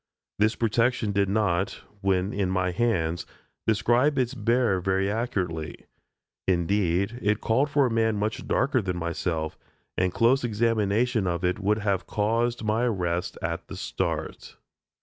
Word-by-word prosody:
This 110 +2 +3
protection 115 -1 +1
did 100 -1 +1
not, 100 -2 0 0.2
when 95 0 +1
in 100 -2 0
my 95 -1 0
hands, 85 -6 0 0.4
describe 120 +6 +3
its 125 0 +1
bearer 115 -4 +1
very 95 +2 +1
accurately. 90 -9 -3 0.6
Indeed, 95 +4 +1
it 105 0 +1
called 135 +6 +1
for 140 -1 +3
a 125 - 0
man 110 -1 +1
much 105 +1 -2
darker 130 -2 +2
than 90 -3 -3
myself, 85 -2 -3 0.4
and 90 0 +1
close 120 +7 +3
examination 115 -1 +1
of 85 0 -1
it 90 - 0
would 105 +2 +1
have 100 -3 -1
caused 115 +3 0
my 110 +2 +1
arrest 90 -6 -1
at 85 0 -3
the - - -7
start. - - -4
105 Hz, 145 wpm, -26 LUFS, 90-115 Hz, 0.6 s, This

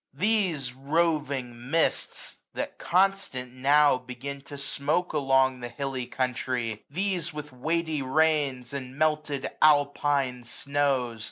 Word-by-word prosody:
149 205 +10 +2 0.2
These 135 -5 -4
roving 140 -4 -1
mists, 165 +2 0 0.2
that - - -4
constant 180 -9 +1
now 140 +1 +4
begin 130 +2 -7
To 145 +1 -10
smoak 140 +6 -1
along 135 -3 +3
the 120 0 -5
hilly 135 -2 -4
country, 125 -3 -2
these 180 +2 -1
735 165 - -7
With 145 -4 -8
weighty 160 -2 0
rains, 140 -3 +1
and 135 -1 -6
melted 150 -2 0
Alpine 145 -3 +3
snows. 130 -2 -1
140 Hz, 120 wpm, -27 LUFS, 130-155 Hz, 0.2 s, now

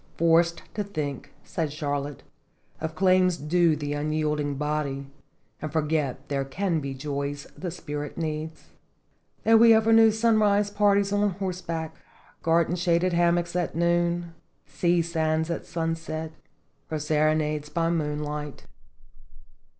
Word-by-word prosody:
"Forced 170 +1 +3
to 210 - -2
think," 150 -9 -5
said 160 -4 -3
Charlotte, 145 -1 -3 0.6
"of 160 0 -4
claims 185 -1 +3
due 165 +1 +2
the 145 -1 -3
unyielding 150 -1 -1
body, 145 -1 -2 0.6
and 155 - -4
forget 150 -3 -1
there 140 -1 -1
can 165 +5 -1
be 135 -2 -5
joys 140 +1 -4
the 180 - -5
spirit 150 -4 -6
needs; 160 -1 -5 0.7
that 225 0 +6
we 230 0 +8
ever 220 +1 +4
knew 225 0 +7
sunrise 215 -2 +3
parties 200 -1 +2
on 205 0 +2
horseback, 175 -4 -4 0.5
gar 165 +1 +3
den 175 - -2
shaded 175 0 +2
hammocks 175 0 +2
at 175 -3 -1
noon, 170 0 +1 0.3
sea 175 -1 +1
sands 160 -1 0
at 170 - -4
sunset, 165 -1 -3 0.6
or 155 - -2
serenades 150 0 0
by 165 0 0
moonlight." 150 -2 -3
160 Hz, 125 wpm, -26 LUFS, 150-175 Hz, 0.7 s, we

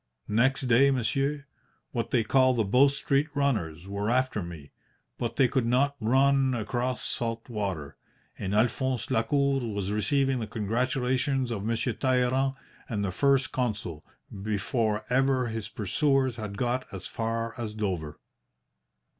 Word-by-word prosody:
"Next 130 +5 +3
day, 130 +2 +5
monsieur, 140 +3 0 0.5
what 115 -2 -2
they 120 -3 +2
call 130 +2 +4
the 115 - +2
Bow 125 +8 +5
Street 140 +1 +1
runners 95 - -1
were 100 +2 -2
after 130 -3 +1
me, 80 -5 -9 0.5
but - - -2
they 135 - +4
could 125 -1 0
not 140 +4 +2
run 135 +3 +3
across 120 +3 -2
salt 115 -1 -3
water, 95 - -4 0.4
and 95 +2 -3
Alphonse 125 +2 0
Lacour 140 +4 +2
was 100 -5 -3
receiving 130 +5 +1
the 110 - -4
congratulations 125 +4 0
of 105 -4 -3
Monsieur 115 +2 0
Talleyrand 130 +1 +1 0.3
and 105 -4 -1
the 95 - -2
First 135 +5 +2
Consul 100 -11 -3 0.4
before 105 +1 -1
ever 130 0 +3
his 110 -2 -4
pursuers 130 - +1
had 105 -3 -6
got 125 +2 -1
as 95 -2 -7
far 115 0 -2
as 110 -2 -4
Dover." 90 -8 -3
120 Hz, 140 wpm, -28 LUFS, 105-130 Hz, 0.5 s, day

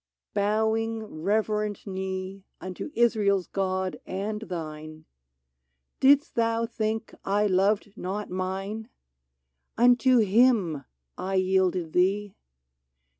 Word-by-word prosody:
— - - -66
bowing 220 +2 0
reverent 210 +4 -1
knee 190 0 -5 0.2
Unto 185 +9 -6
Israel's 210 -5 +2
God 190 -1 -2
and 210 +3 -3
thine 155 -5 -7 0.5
— 65 0 -53
Did' 280 +2 +6
St - - -28
thou 230 0 +1
think 225 -1 -3
I 205 +2 +1
loved 200 +1 +1
not 205 +1 -4
mine? 195 +4 -4 0.9
Unto 245 +2 +5
him 205 - +3 0.3
I 190 +1 -2
yielded 185 -3 +1
thee 195 +2 +1
200 Hz, 105 wpm, -27 LUFS, 185-220 Hz, 0.9 s, Did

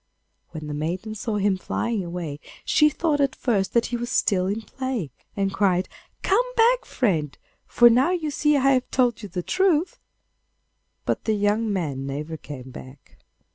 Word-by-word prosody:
When 155 -1 -7
the 150 - -5
maiden 175 +8 -3
saw 220 +1 -3
him 200 -1 +1
flying 225 +1 -2
away 170 -4 -5 0.3
she 300 - +5
thought 300 -1 0
at 275 -1 +1
first 200 -7 0
that 235 - +4
he - - +1
was 240 0 -4
still 185 -2 +2
in 205 +3 -2
play, 255 - -4 0.3
and 195 -1 0
cried, 185 -2 +2 0.4
'Come 400 +5 +4
back, 480 +2 +4
friend, 160 - -1 0.3
for 240 - +6
now 250 +6 +4
you 335 -5 -1
see 295 0 +2
I 275 0 +4
have 255 -1 +1
told 245 -4 +1
you 205 - -7
the 180 0 -4
truth.' 370 - +1 1.1
But - - -1
the 220 - +2
young 210 +2 +1
man 145 -8 -2
never 150 +4 -4
came 130 -4 -9
back. 130 +2 -13
210 Hz, 175 wpm, -24 LUFS, 170-260 Hz, 1.1 s, for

